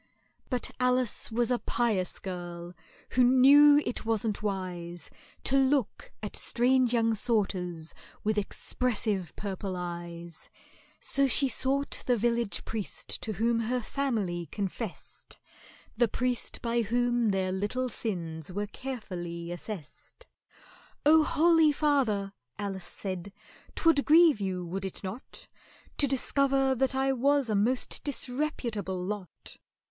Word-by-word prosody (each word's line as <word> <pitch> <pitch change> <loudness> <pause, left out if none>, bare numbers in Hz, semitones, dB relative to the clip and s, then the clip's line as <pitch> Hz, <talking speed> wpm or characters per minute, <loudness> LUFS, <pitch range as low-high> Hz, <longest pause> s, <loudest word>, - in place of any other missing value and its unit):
But 250 -2 -2
ALICE 250 -2 +1
was 235 +1 +1
a 245 - +2
pious 215 -7 0
girl, 175 -2 -6 0.4
who 250 - +4
knew 285 +4 +7
it - - -3
wasn't 225 -2 0
wise 180 -4 -4 0.3
To 270 - +4
look 270 -3 +1
at 210 - -4
strange 250 +1 +2
young 230 -2 +2
sorters 185 -7 0 0.3
with 215 0 +1
expressive 210 - -1
purple 195 -2 -4
eyes; 170 -1 -7 0.5
So 275 0 +1
she 275 +2 +3
sought 275 +2 0
the 245 -1 +3
village 235 -1 0
priest 220 -3 -3
to 220 - -3
whom 230 +4 +1
her 240 +3 0
family 215 -10 -2
confessed, 200 0 -5 0.6
The 240 - +3
priest 250 +2 -2
by 235 0 +1
whom 240 +1 +1
their 190 -1 0
little 205 +7 -1
sins 170 -9 -4
were 205 +3 -2
carefully 180 -8 -6
assessed. 175 - -8 0.8
"Oh, 315 +1 +7
holy 325 0 +4
father," 255 -10 +1 0.2
ALICE 195 -3 -4
said, 185 +1 -5 0.4
"'t - - -2
would 320 -4 +5
grieve 315 -6 +6
you, 185 -2 -2
would 190 +3 -4
it 190 +1 -5
not, 195 +7 -5 0.5
To 285 - +6
discover 270 0 +2
that 265 +1 0
I 270 0 +2
was 275 -1 +2
a - - +1
most 240 +6 +1
disreputable 245 -9 -2
lot? 190 0 -6
225 Hz, 125 wpm, -29 LUFS, 190-260 Hz, 0.8 s, knew